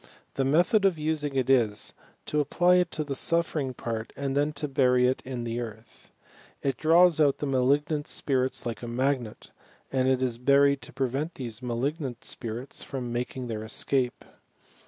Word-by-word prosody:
The 135 - 0
method 175 - +3
of 190 -4 +3
using 150 -2 -2
it 130 -2 +1
is, 115 -6 +2 0.3
to 150 - 0
apply 175 +5 +3
it 180 -1 +2
to 155 - -3
the 145 -2 -4
suffering 155 -4 0
part, 115 -1 -4
and 140 -1 -2
then 145 +1 +2
to 150 0 -4
bury 125 -2 +3
it 130 - 0
in 125 -2 -5
the 115 0 -3
earth. 110 -1 -9 0.5
It 135 -1 0
draws 165 0 +5
out 140 -2 +4
the - - -3
malignant 145 +3 +1
spirits 130 -2 -1
like 115 -1 -4
a 120 - -6
magnet, 125 -1 -2 0.4
and 130 -1 +1
it 130 -1 +2
is 120 -2 -1
buried 140 +2 +4
to - - -9
prevent 135 +5 -2
these 120 -3 -6
malignant 125 +2 -3
spirits 120 +2 -6
from 125 -3 -5
making 125 +1 -3
their 110 -2 -4
escape. 125 +3 0
135 Hz, 175 wpm, -27 LUFS, 125-150 Hz, 0.5 s, draws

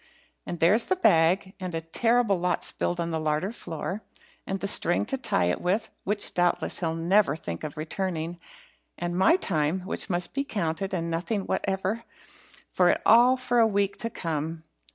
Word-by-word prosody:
And 175 - -4
there's 200 +8 +4
the 375 - +1
bag 185 - +3
and 180 -2 -5
a 165 - -2
terrible 225 +4 +1
lot 180 0 0
spilled 175 - -2
on 170 0 -2
the 160 - -1
larder 155 +5 -1
floor 185 -1 -5 0.5
and 195 0 -2
the 200 - -2
string 175 -3 +1
to 270 - -2
tie 90 - 0
it 90 - -1
with, 190 +5 0 0.2
which 205 +1 0
doubtless 175 0 +1
he'll 165 -2 -1
never 170 -1 +3
think 85 - -6
of 150 -1 -6
returning 170 +1 -3 0.6
and 175 0 -3
my 190 - +5
time, 170 - 0
which 190 +2 -1
must 175 -1 0
be 275 - -1
counted, 190 - -2
and 170 -3 -2
nothing 190 +6 -1
whatever 195 +4 -2 0.7
for - - +4
it - - +2
all 245 +3 +6
for 245 -1 +1
a 225 - +6
week 200 -1 0
to 230 - -2
come." 160 -4 -4
180 Hz, 180 wpm, -26 LUFS, 165-205 Hz, 0.7 s, all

